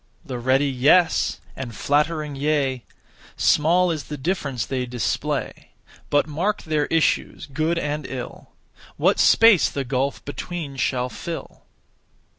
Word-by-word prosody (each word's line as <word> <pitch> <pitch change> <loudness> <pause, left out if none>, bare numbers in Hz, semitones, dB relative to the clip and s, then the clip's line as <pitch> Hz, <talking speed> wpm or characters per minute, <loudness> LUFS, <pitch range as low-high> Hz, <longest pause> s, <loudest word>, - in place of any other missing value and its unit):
The 125 -2 -5
(ready) 130 +3 +2
'yes,' 140 +7 +3 0.2
and 120 -4 -6
(flattering) 150 +2 0
'yea;' 135 -3 0 0.5
Small 175 +4 +3
is 155 -3 -4
the 150 - -6
difference 140 - -2
they 130 -2 -3
display. 120 -3 -3 0.4
But 145 0 +3
mark 175 +8 -2
their 155 -2 0
issues, 165 -1 0
good 155 +4 -1
and 150 -2 -3
ill; 125 -2 -7 0.5
What - - +2
space 225 -6 +6
the 140 - -3
gulf 135 +2 -2
between 150 0 -5
shall 125 -1 0
fill? 165 +5 -8
145 Hz, 125 wpm, -23 LUFS, 130-160 Hz, 0.5 s, space